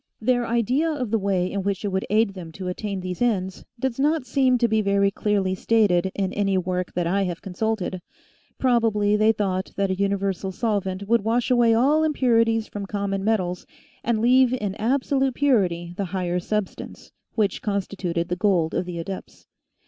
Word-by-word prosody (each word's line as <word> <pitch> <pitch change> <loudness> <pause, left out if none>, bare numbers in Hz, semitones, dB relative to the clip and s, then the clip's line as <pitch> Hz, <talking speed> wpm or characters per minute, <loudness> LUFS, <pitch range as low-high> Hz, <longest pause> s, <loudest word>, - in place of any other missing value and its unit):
Their 245 +1 +1
idea 245 +7 +1
of 255 -8 -3
the 225 - +2
way 190 -2 0
in 200 - -2
which 200 +1 -2
it - - 0
would 190 0 -2
aid 215 0 +3
them 175 -4 -8
to 185 +1 -6
attain 195 +1 -4
these 180 +2 -5
ends 190 -6 0 0.2
does 265 -1 -2
not 300 0 +1
seem 255 0 +2
to 235 -1 +2
be 220 -1 +2
very 200 -1 +2
clearly 200 -3 0
stated 190 -3 +2
in 190 -2 -1
any 195 -2 +1
work 180 0 -2
that 175 -1 -1
I 190 +4 +1
have 175 -2 -5
consulted; 190 -1 -2 0.6
probably 225 -5 +2
they 215 +1 +4
thought 190 -3 -2
that 195 -1 0
a - - 0
universal 195 -1 -1
solvent 200 -2 -2
would 235 0 +3
wash 235 +3 0
away 235 -2 +4
all 290 +7 +3
impurities 230 -7 +2
from 200 -1 -6
common 200 -1 -2
materials 185 -5 -1 0.4
and 225 -2 0
leave 255 +1 +4
in 205 -5 -3
absolute 265 +2 +1
purity 180 -11 +1
the 200 - -2
higher 180 -1 -2
substance, 210 +2 -4 0.2
which 205 -5 0
constituted 185 -4 -2
the 180 - 0
gold 180 -4 +1
of 180 - -1
the 175 -1 -5
adepts. 185 +3 -7
200 Hz, 180 wpm, -24 LUFS, 185-230 Hz, 0.6 s, they